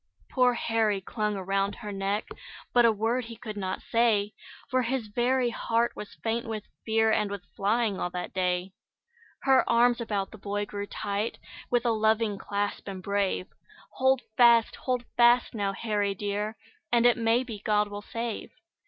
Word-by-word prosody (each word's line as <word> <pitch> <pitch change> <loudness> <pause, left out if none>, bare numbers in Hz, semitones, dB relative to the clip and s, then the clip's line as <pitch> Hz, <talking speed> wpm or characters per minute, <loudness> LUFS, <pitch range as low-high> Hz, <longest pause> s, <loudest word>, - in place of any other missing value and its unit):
Poor 250 -2 +3
Harry 225 -3 +1
clung 210 +2 -2
around 195 +1 -1
her 210 -3 -7
neck, 200 +1 -2 0.5
But 240 -1 +6
a - - +5
word 225 +4 0
he 230 0 -8
could 215 -1 -7
not 190 -2 -4
say, 220 -3 +2 0.3
For 255 -2 +1
his 250 0 -1
very 245 +3 +1
heart 235 0 0
was 210 - -8
faint 230 +1 -1
with 220 -2 -4 0.2
fear, 220 0 +2
And 210 -1 +1
with 200 -2 -6
flying 210 -1 +1
all 180 - -1
that 180 0 -5
day. 180 0 0 0.7
Her 265 -1 +5
arms 240 +1 +4
about 205 -4 -2
the 215 - -12
boy 205 +1 -2
grew 205 0 -5
tight, 205 +2 -3 0.3
With 245 0 +1
a 235 - +3
loving 220 -1 +1
clasp, 205 0 -3
and 190 -2 -6
brave; 200 -2 0 0.5
"Hold 265 0 +3
fast! 235 -2 +5
Hold 250 -2 -2
fast, 240 +1 +5
now, 200 -3 -1
Harry 205 -1 -1
dear, 205 +2 -3 0.3
And 240 0 +4
it 245 - +6
may 230 +1 +2
be 225 -5 -7
God 210 0 +2
will 205 0 -7
save." 230 +1 -5
220 Hz, 170 wpm, -28 LUFS, 200-235 Hz, 0.7 s, But